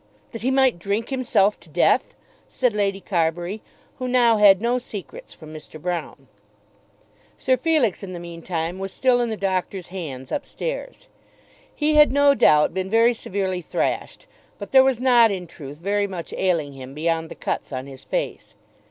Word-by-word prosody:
"That 230 - -7
he 250 - 0
might 265 -7 +3
drink 205 +5 -2
himself 240 -6 +1
to - - -18
death," - - +2 0.3
said 250 -4 0
Lady 200 -2 0
Carbury, 175 +2 -1 0.4
who 255 - -3
now 240 -3 +4
had 200 -3 +7
no 240 +3 0
secrets 205 -6 -9
from 155 -1 -12
Mr. 155 0 -11
Broune. 175 +1 -4 1.1
Sir 260 - +2
Felix 255 - +1
in 195 -2 -7
the 175 - -6
mean 170 -1 -9
time 170 +1 -3
was 195 0 -4
still 250 +1 +2
in 240 - -1
the 220 - -3
doctor's 190 -1 -2
hands 145 -9 -7
up - - -2
stairs. - - -6 0.7
He 305 0 +1
had 300 -2 +6
no 285 +1 +5
doubt 150 - +4
been 190 +1 -3
very 230 +3 +4
severely 190 -4 -3
thrashed, - - -3 0.3
but - - -8
there 265 -1 +7
was 265 -3 +1
not 245 -3 +5
in 190 -3 -4
truth 145 -3 -10
very 200 +2 0
much 180 -4 -7
ailing 165 -7 0
him 135 0 -10
beyond 165 +1 -1
the - - -9
cuts - - -4
on 130 -1 -4
his 135 -1 -12
face. - - -4
195 Hz, 180 wpm, -23 LUFS, 170-245 Hz, 1.1 s, had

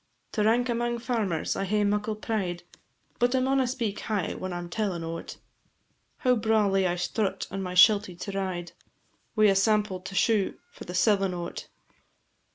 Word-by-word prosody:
To 210 - 0
rank 235 +3 +3
amang 240 0 -1
farmers 225 -9 -1
I - - -2
hae 210 +2 +1
muckle 210 +1 0
pride, 195 -5 -3 0.6
But 245 +2 +2
I - - +3
mauna 265 0 +2
speak 235 -5 -2
high 205 -6 -2
when 185 0 -5
I 175 - -3
'm 175 0 -6
tellin' 180 -2 -2
o't, 165 0 -6 0.8
How 250 -1 +3
brawlie 210 -4 +2
I 175 - 0
strut 190 +3 -1
on 195 +1 -3
my 180 -1 -4
shelty 200 -1 +6
to 200 +4 -6
ride, 185 -3 -3 0.6
Wi' 215 -1 +4
a 195 -2 +5
sample 210 -1 +2
to 190 +2 -8
shew 210 -2 +2
for - - -11
the 180 - -6
sellin' 195 -1 +2
o't. 175 0 -6
205 Hz, 170 wpm, -27 LUFS, 180-225 Hz, 0.8 s, shelty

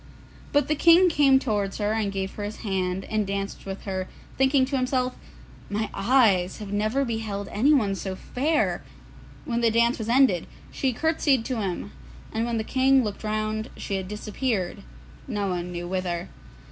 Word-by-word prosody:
But 290 0 +3
the 305 - +2
King 340 +4 +6
came 280 -4 +5
towards 205 -7 -1
her 210 0 0
and 215 -3 0
gave 190 -1 -3
her 205 - -6
his 205 +1 -6
hand, 190 -1 -1
and 215 -2 -1
danced 200 0 -4
with 195 0 -6
her, 190 -2 -3 0.3
thinking 265 0 +3
to 270 +2 -3
himself, 255 -1 0 0.5
'My 210 +1 -2
eyes 195 -5 +3
have 205 -1 -7
never 215 +7 +1
beheld 220 -4 -3
anyone 235 -3 +3
so 190 -1 -4
fair!' 295 +10 0 0.6
When 235 -1 -1
the 230 - +4
dance 235 +2 +2
was 220 0 -4
ended, 245 -8 +4 0.2
she 265 - 0
curtseyed 280 -2 +1
to 255 - -2
him, 180 - -3 0.4
and 225 +1 0
when 235 -1 -1
the 220 - -1
King 265 +2 +3
looked 210 -1 -4
round 215 +1 -2
she - - -5
had 190 -1 -4
disappeared, 210 -1 -2 0.5
no 205 -1 -1
one 180 -1 -3
knew 175 0 -5
whither. 180 -2 -2
215 Hz, 170 wpm, -25 LUFS, 195-260 Hz, 0.6 s, King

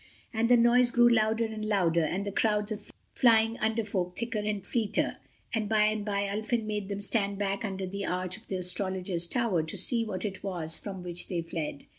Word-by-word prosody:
And 230 +1 +1
the 245 - +7
noise 240 +1 +5
grew 240 0 +5
louder 225 -1 +3
and 220 -1 -5
louder, 180 -6 +2
and 185 +6 -1
the 200 - -2
crowds 210 +1 +1
of 210 -1 -5 0.2
flying 225 -1 +4
Under 220 +1 +1
Folk 180 -4 -2
thicker 230 -2 -2
and 210 -2 -2
fleeter, 225 -4 0 0.4
and 215 -2 -1
by 215 -1 +4
and 215 0 +1
by 200 -1 0
Ulfin 220 +3 -1
made 210 -2 -3
them 200 0 -3
stand 200 -1 0
back 200 +2 -1
under 195 -2 -3
the 200 +1 -4
arch 180 0 -2
of 220 - -14
the 190 - -3
Astrologers' 180 -1 -2
Tower 230 -6 +1
to 160 0 -6
see 235 -3 +2
what 210 -2 -4
it 195 -2 -4
was 165 -5 -4
from 190 -3 -7
which 175 -1 -5
they 175 -2 -2
fled. 165 -4 -5
205 Hz, 210 wpm, -29 LUFS, 185-220 Hz, 0.4 s, the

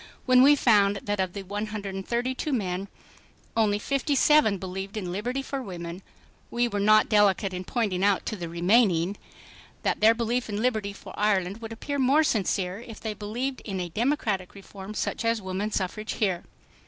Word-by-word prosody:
When 255 -1 +6
we 285 +3 +7
found 205 -7 +4
that 205 -1 -2
of 185 -2 -1
the 200 - -6
132 210 +6 -3
men 195 -6 -2 0.7
only 210 -2 +2
5'7 275 - +3
believed 190 +2 -5
in 180 -4 -3
liberty 245 +8 -2
for 275 - -4
American 185 -10 -6
women, 170 +2 -6 0.5
we 240 0 +1
were 205 -3 -3
not 215 +1 +5
delicate 205 -2 +3
in 180 0 -4
pointing 195 -3 -1
out 200 -1 +2
to - - -3
the 175 -4 -6
remaining 175 0 +3
"(5 - - -19 0.7
that - - 0
their 225 +2 +6
belief 235 +1 -1
in 205 0 -2
liberty 220 -4 0
for 200 - -11
Ireland 200 0 0
would 225 0 -7
appear 285 +5 -4
more 275 +4 +4
sincere 195 -6 0
if 230 -2 -10
they 220 -1 -4
believed 235 +6 -4
in 195 -3 -4
a 175 -1 -3
democratic 210 - -1
reform 200 +1 -10
such - - -2
as 230 0 +1
woman 190 +2 -3
suffrage 215 +2 -3
here. 190 -5 -1
210 Hz, 180 wpm, -26 LUFS, 190-235 Hz, 0.7 s, we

